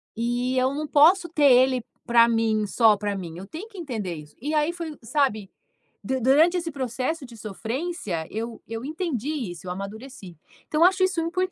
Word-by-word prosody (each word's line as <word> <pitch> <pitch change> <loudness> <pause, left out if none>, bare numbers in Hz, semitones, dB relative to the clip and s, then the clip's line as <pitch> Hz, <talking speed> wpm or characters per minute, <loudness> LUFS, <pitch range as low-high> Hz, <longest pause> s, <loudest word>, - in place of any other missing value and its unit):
E 240 +3 -1
eu 260 +1 +2
não 300 +2 -3
posso 335 +6 +5
ter 295 -4 +4
ele 255 0 +4 0.2
para 235 -1 +6
mim, 225 -2 +1
só 220 +1 +4
para 205 0 -2
mim. 170 -3 -7
Eu 185 - -8
tenho 335 - -8
que 415 - -15
entender 225 - -4
isso. 150 -1 -12
E 295 +4 -2
aí 305 +1 +2
foi 335 -2 -5
um, 300 - -12
sabe, 220 -6 0 0.5
du 260 0 -2
durante 300 +8 +5
esse 335 -2 -3
processo 265 +3 -3
de 240 -2 -13
sofrência, 220 - -4
eu 225 +1 -5
eu 225 +2 -5
entendi 305 - -3 0.2
isso, 175 +1 -10
eu - - -3
amadureci. 200 - -8 0.3
Então, 305 - -1
eu - - +8
acho 375 +1 +4
isso 370 -2 +1
import. 365 +3 -1
255 Hz, 200 wpm, -25 LUFS, 220-315 Hz, 0.5 s, eu